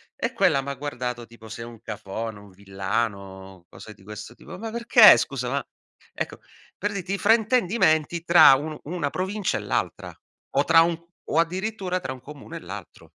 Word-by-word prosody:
e - - -3
quella 135 - +3
m' 135 - -11
ha 140 - -4
guardato 125 -3 -5
tipo 115 -1 -14
sei 115 +1 -7
un 115 -2 -12
cafone, 110 +2 -6
un 100 0 -15
villano, 95 -1 -4
cose 110 - -12
di 95 - -21
questo 105 +2 -9
tipo. 155 - -11
"Ma 225 +2 -6
perché 235 0 +7
scusa, - - -2
ma". - - -1 0.5
Ecco, - - -5 0.4
per 205 - -2
dirti 195 0 -4
i - - 0
fraintendimenti 205 -7 +2
tra 170 -5 +8
un 150 +3 -5
una 155 -2 -3
provincia 190 +1 -2
e - - -5
l'altra - - -3 0.4
o 140 - +4
tra 165 - +6
un 165 0 +1 0.3
o 155 - -2
addirittura 185 +2 -1
tra 130 - -5
un 130 - -13
comune 145 +1 -10
e - - -7
l'altro. - - -10
145 Hz, 185 wpm, -24 LUFS, 110-185 Hz, 0.5 s, tra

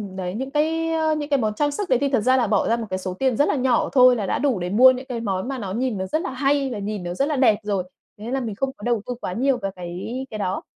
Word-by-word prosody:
đấy, 180 -1 -4
những 265 +4 -4
cái, 325 +2 0
ơ, 315 -1 +1
những 295 -1 -4
cái 280 -2 +2
món 215 -3 0
trang 290 +3 +1
sức 380 +5 -4
đấy 255 - +3
thì 280 - +1
thật 265 -3 +2
ra 255 +4 +3
là 240 - +2
bỏ 205 -1 +1
ra 230 - +3
một 230 - -4
cái 185 0 -2
số 185 -1 -4
tiền 255 +3 0
rất 290 - +3
là - - +1
nhỏ 255 -3 +1
thôi 255 -1 +7
là 215 -4 -2
đã - - -1
đủ 265 -7 +1
để 175 0 -3
mua 250 +7 +7
những 255 +1 -5
cái 250 -3 -4
món 195 -2 -2
mà 270 0 -3
nó 195 -4 -4
nhìn 245 0 -1
nó 190 - -2
rất 310 +12 -1
là 385 - -3
hay 275 +1 +1
và 220 - -4
nhìn 205 -1 -4
nó 175 0 -4
rất 275 +10 0
là 300 - -1
đẹp 245 -6 +4
rồi. 200 -3 -1 0.4
Thế 225 +4 -6
là 270 - 0
mình 225 -5 -4
không 270 +5 -1
có - - -14
đầu 235 -2 0
tư 250 - -4
quá 180 - -3
nhiều 265 +4 +1
về 195 -5 -3
cái 180 +9 -5
cái 215 - -6
đó. 190 -2 -2
245 Hz, 330 wpm, -23 LUFS, 205-275 Hz, 0.4 s, thôi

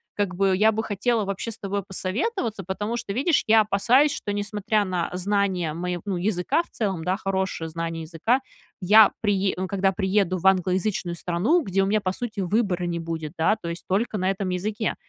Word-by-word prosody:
как 200 -3 -1
бы, 195 0 +2
я 220 +1 +4
бы 220 +1 -1
хотела 220 +2 0
вообще 195 +3 -4
с 225 - -6
тобой 200 0 -3
посоветоваться. 210 - -3
Потому 210 +5 -3
что, 215 -4 -4
видишь, 285 - +2
я 220 0 +6
опасаюсь, 240 +8 +3
что, 205 - -4
несмотря 205 +1 0
на 180 -3 -2
знание 185 -3 0
мое 175 0 -3
ну, 195 -3 -2
языка 180 - +1
в - - -23
целом, 190 -7 -2
да, 185 +1 +1
хорошее 190 -4 -2
знание 165 0 -4
языка, 175 - 0 0.4
я 210 +3 +7
прие 200 -2 +1
ну, 185 0 -2
когда 195 -1 +1
приеду 190 -1 +1
в 180 - -9
англоязычную 185 -1 +1
страну, 185 - +1
где 195 0 +1
у - - +1
меня, 210 +1 +1
по 185 - -1
сути, 215 -2 -4
выбора 185 -2 0
не 170 -1 -2
будет, 160 -2 -5
да, 165 +7 +3
то 170 - -4
есть 170 - -7
только 210 +3 0
на 185 0 0
этом 195 -1 -2
языке. 210 +5 -2
195 Hz, 200 wpm, -24 LUFS, 180-215 Hz, 0.4 s, я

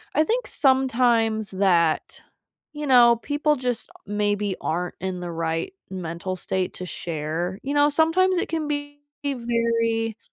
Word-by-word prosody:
I 310 - +5
think - - 0
sometimes 240 -5 +2
that, 175 -5 +1 0.5
you 295 -1 -5
know, 240 -2 +7
people 300 +1 +1
just 245 -2 -3 0.2
maybe 205 -1 0
aren't 175 +2 -2
in 185 -1 -3
the 175 -1 -5
right 165 - -2 0.2
mental 185 0 -4
state 185 0 -2
to 185 - -6
share. 170 +3 -4
You 280 +2 -2
know, 290 0 +5
sometimes 340 +5 +3
it - - -2
can 320 -2 -2
be 290 0 -4 0.3
very 230 -3 0
230 Hz, 140 wpm, -24 LUFS, 185-290 Hz, 0.5 s, know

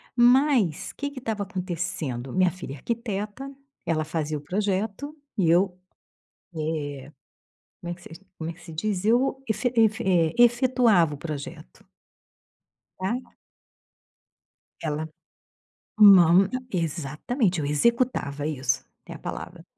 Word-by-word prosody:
Mas 245 - +3
que 285 - -4
que 285 -2 -9
estava 220 -4 -3
acontecendo? 175 -9 -4
Minha 185 -1 +3
filha 180 -6 -8
é - - -7
arquiteta. 225 - -4 0.4
Ela 160 -2 0
fazia 155 -1 -2
o - - -8
projeto 205 - -2 0.2
e 180 -5 +3
eu, 180 +2 +3 0.8
eh, 150 -3 -4 0.7
como 175 - -5
é - - -4
que 175 - -19
se 175 +3 -12
como 160 0 -4
é - - -5
que 175 - -20
se 165 - -11
diz? 190 +3 -2
Eu 255 +4 +2
efe 240 +3 0
efe 220 0 +3
eh, 170 -4 +3
efetuava 240 - +4
o - - -9
projeto 145 - -8 1.1
tá. 190 +5 -1 1.7
Ela 155 0 -2 0.9
não. 190 -3 +8 0.2
Exatamente, 170 - -1
eu 145 - -2
executava. 150 - +1
Isso, 135 -4 -1 0.2
é - - -8
a - - -9
palavra. - - -7
180 Hz, 125 wpm, -25 LUFS, 155-225 Hz, 1.7 s, não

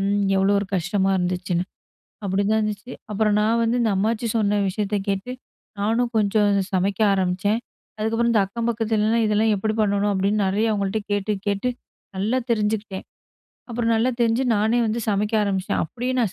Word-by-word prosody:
ம். 200 +1 +1 0.2
எவ்ளோ 195 +1 +3
ஒரு 200 - -2
கஷ்டமா 190 +2 +1
இருந்துச்சுன்னு. 180 -1 -1 0.6
அப்பிடிதான் 200 +3 +1
இருந்துச்சு. 210 +3 -4 0.2
அப்பறம் 210 0 +2
நான் 225 +2 +2
வந்து 230 +2 +1
இந்த 225 - +2
அம்மாச்சி 220 +3 0
சொன்ன 205 -1 +1
விஷயத்த 205 +2 -1
கேட்டு, 200 +5 -2 0.5
நானும் 230 +4 +1
கொஞ்சம் 205 0 +2 0.2
சமைக்க 190 +1 0
ஆரம்பிச்சேன். 190 +3 0 0.4
அதுக்கப்புறம், 225 +2 +1
இந்த 220 - +3
அக்கம் 230 +4 -4
பக்கத்துலலாம், 225 0 +1
"இதெல்லாம் 215 +1 +2
எப்படி 215 +2 -1
பண்ணணும்?" 205 0 +1
அப்டீன்னு 200 +2 +1
நெறைய 210 +4 +1
அவுங்கள்ட்ட 200 0 -1
கேட், 205 0 -1
டு - - +3
கேட்டு 200 +5 0 0.5
நல்லா 215 +7 0
தெரிஞ்சுக்கிட்டேன். 210 -3 -1 0.6
அப்பறம் 230 -1 0
நல்லா 225 +3 +2
தெரிஞ்சு, 235 +2 +2
நானே 220 +3 +2
வந்து 220 +2 -1
சமைக்க 210 +1 0
ஆரம்பிச்சிட்டேன். 195 -2 -1
அப்டியே 245 +10 -4
நான் 215 -6 0
210 Hz, 160 wpm, -23 LUFS, 195-225 Hz, 0.6 s, எவ்ளோ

